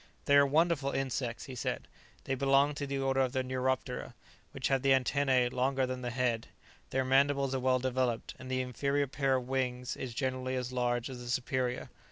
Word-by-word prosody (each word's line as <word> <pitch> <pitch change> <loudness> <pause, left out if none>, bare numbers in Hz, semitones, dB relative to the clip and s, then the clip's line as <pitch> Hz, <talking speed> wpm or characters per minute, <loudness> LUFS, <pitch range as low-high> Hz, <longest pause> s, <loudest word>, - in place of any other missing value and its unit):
"They 140 - +4
are 140 0 +7
wonderful 155 -1 +2
insects," 130 -3 -2
he 135 - -8
said; 125 - -3 0.4
"they 135 - -2
belong 140 +2 +3
to 145 -1 -4
the 140 0 -2
order 135 0 +1
of 130 -1 +1
the 130 -1 0
Neuroptera, 130 -1 -2 0.4
which 130 - -2
have 135 -1 +2
the 135 0 +4
antennae 130 -1 +2
longer 130 +1 +1
than 130 0 -4
the 125 - -2
head; 120 -2 0 0.4
their 130 0 0
mandibles 135 0 +3
are 135 - 0
well 130 0 +3
developed, 130 -2 -1
and 130 0 -9
the 130 0 0
inferior 140 +3 0
pair 135 0 +1
of 125 -1 -2
wings 125 -1 -1
is 125 -3 -6
generally 130 0 -1
as 125 -1 -3
large 120 -1 0
as 130 -2 -7
the 120 0 -7
superior. 125 0 -1
130 Hz, 200 wpm, -32 LUFS, 125-135 Hz, 0.4 s, are